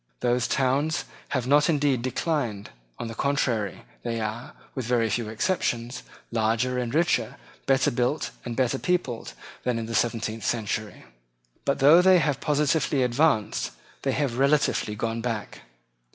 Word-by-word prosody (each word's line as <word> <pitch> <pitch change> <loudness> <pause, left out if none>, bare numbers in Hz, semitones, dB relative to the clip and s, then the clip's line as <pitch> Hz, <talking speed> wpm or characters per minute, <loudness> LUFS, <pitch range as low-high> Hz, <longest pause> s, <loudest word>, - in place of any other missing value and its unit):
Those 120 0 +1
towns 140 +3 +1 0.2
have 130 -3 -1
not 145 +5 +4
indeed 145 -5 +2
declined. 125 -5 -2 0.3
On - - -4
the 115 - -6
contrary, 120 -6 -1 0.2
they 115 -1 -2
are, 110 +2 -4 0.2
with 130 -4 -4
very 115 -3 +2
few 115 0 -1
exceptions, 120 - -1 0.3
larger 115 +3 +1
and 120 -2 -2
richer, 150 -7 +1 0.3
better 135 0 +3
built 125 +5 0
and 120 -1 -5
better 130 +1 +1
peopled, 175 -10 -1 0.3
than 125 -2 0
in 115 - -3
the 115 - -6
seventeenth 115 -1 -1
century. 110 -1 -2 0.6
But, 140 - +1
though 150 +6 +7
they 185 0 +6
have 145 -4 +1
positively 150 -2 +2
advanced, 125 -3 +1 0.3
they 135 - 0
have 130 -4 -1
relatively 140 -6 +2
gone 115 +1 -2
back. 115 -3 -4
125 Hz, 145 wpm, -26 LUFS, 115-140 Hz, 0.6 s, though